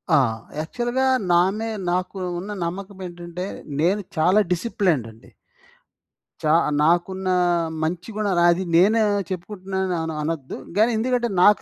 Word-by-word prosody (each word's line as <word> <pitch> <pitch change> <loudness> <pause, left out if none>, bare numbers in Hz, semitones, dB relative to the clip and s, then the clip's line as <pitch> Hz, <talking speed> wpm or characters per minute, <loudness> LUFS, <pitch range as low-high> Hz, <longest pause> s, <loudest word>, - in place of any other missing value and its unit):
ఆ! - - +6 0.4
యాక్చువల్‌గా 240 +10 -1 0.3
నా‌నే 195 +6 +2 0.2
నాకు 185 +2 -2 0.2
ఉన్న 195 +4 -6
నమ్మకం 190 +3 -6
ఏంటంటే? 175 +1 -7 0.3
నేను 190 +6 +2 0.2
చాలా 180 +6 +4
డిసిప్లేన్డ్ 180 - 0
అండి. 110 - -18 1.1
చా 155 0 +3 0.3
నాకున్న 175 +4 +1 0.6
మంచి 175 +5 -3
గుణాలు 200 -5 +1
అది 175 +2 +2
నేను 210 +6 +5 0.3
చెప్పుకుంటున్నాను 185 -3 -3
అనొద్దు. 150 -3 -3 0.2
కాని 225 +3 +4
ఎందుకంటే 240 0 0
నాకు 210 -1 +6
185 Hz, 115 wpm, -23 LUFS, 170-210 Hz, 1.1 s, ఆ